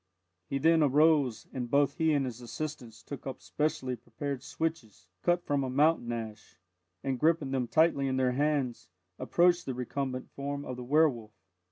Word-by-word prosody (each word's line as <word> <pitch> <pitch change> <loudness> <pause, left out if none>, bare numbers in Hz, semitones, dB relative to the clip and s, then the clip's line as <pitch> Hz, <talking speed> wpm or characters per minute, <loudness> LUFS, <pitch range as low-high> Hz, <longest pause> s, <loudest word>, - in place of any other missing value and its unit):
He 140 - 0
then 160 +3 +4
arose, 145 -4 +3
and 125 -2 -4
both 140 +1 +2
he 160 -1 +3
and 140 -3 +2
his 125 -1 -6
assistants 120 -3 -6
took 140 -2 -8
up 135 - -5
specially 130 -4 -2
prepared 125 +4 -5
switches, 135 - -4
cut 175 0 +1
from 140 -1 0
a 130 - -2
mountain 140 -2 +2
ash, 110 -4 -7 0.5
and 135 -2 -1
gripping 155 -3 +2
them 130 -2 0
tightly 155 -1 +3
in 130 0 0
their 130 -1 +2
hands, 140 -2 -1 0.3
approached 175 0 +3
the 130 - -2
recumbent 130 +1 -4
form 140 +1 -4
of 130 - -5
the 125 - -7
werwolf. 125 -6 +2
135 Hz, 170 wpm, -30 LUFS, 125-150 Hz, 0.5 s, then